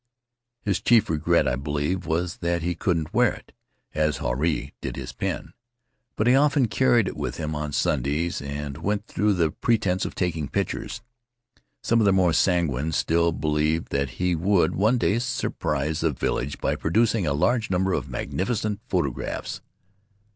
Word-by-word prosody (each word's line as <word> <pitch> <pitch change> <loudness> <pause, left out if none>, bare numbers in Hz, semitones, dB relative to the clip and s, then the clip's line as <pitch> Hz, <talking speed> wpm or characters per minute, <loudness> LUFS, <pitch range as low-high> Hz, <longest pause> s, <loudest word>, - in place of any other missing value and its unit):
His 100 -2 0
chief 115 -5 +4
regret, 80 -1 +2
I 65 - +1
believe, 75 +6 -2
was 85 +2 -1
that 85 -1 -1
he 90 +1 0
couldn't 85 -3 -1
wear - - +4
it, - - -14 0.4
as 75 -1 +1
Huarai 75 +6 -1
did - - -4
his - - -6
pen. - - -4 0.6
But 110 - 0
he 125 - +5
often 140 -2 +3
carried 120 -5 +3
it - - -4
with - - -4
him 75 -1 -3
on 75 -1 -3
Sundays 75 +6 0
and 70 0 -5
went 100 +4 -1
through 105 -3 +1
the 85 -3 +2
pretense 105 -4 +1
of - - -4
taking 80 -5 -1
pictures. - - -3 0.8
Some 115 - +3
of - - +3
the 100 - +5
more 90 -3 +3
sanguine 80 -5 +1
still 85 +2 +2
believed 75 +1 0
that 70 -2 -2
he 90 -1 +1
would 90 +3 +2
one 110 +6 +2
day 115 -1 +2
surprise 80 - -2
the 80 - +2
vil - - -1
lage 70 +3 -3
by - - 0
producing 105 +1 +1
a 70 - +1
large 110 - +1
number 95 0 +1
of - - -2
magnificent 100 - -2
photographs. 85 - -2
85 Hz, 170 wpm, -25 LUFS, 75-100 Hz, 0.8 s, he